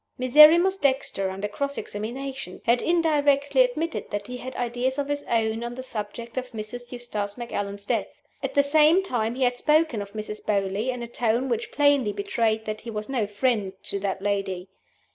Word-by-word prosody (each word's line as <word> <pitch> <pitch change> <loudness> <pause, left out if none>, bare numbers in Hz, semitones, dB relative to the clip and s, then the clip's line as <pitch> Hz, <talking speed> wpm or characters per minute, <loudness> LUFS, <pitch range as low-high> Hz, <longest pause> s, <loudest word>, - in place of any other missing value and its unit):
Miserrimus 305 +9 +7
Dexter, 265 - 0
under 195 +2 -3
cross 280 +7 -3
examination, 245 0 -5
had 240 +1 +3
indirectly 295 - +3
admitted 335 -10 -1
that 205 0 -3
he 250 +2 -6
had 255 +1 -7
ideas 245 +2 -1
of 285 -1 -1
his 290 0 -1
own 225 0 +1
on 240 0 -5
the 260 - -6
subject 230 +1 -5
of 250 -1 -9
Mrs. 235 +3 -7
Eustace 215 -5 -4
Macallan's 205 -4 -4
death. - - 0 0.3
At - - -4
the 285 - +5
same 310 +5 +5
time 235 -9 -1
he 260 - 0
had 245 0 +2
spoken 305 -7 +2
of 200 0 -8
Mrs. 215 0 -6
Beauly 200 +3 0
in 250 -1 -3
a - - -5
tone 240 +2 0
which 235 -1 -2
plainly 285 -6 +3
betrayed 230 - 0
that 215 0 -4
he 235 - -8
was 215 0 -5
no 240 -6 0
friend 210 -2 0
to 200 - -1
that 195 -1 -3
lady. 195 -2 -2
240 Hz, 185 wpm, -25 LUFS, 210-280 Hz, 0.3 s, Miserrimus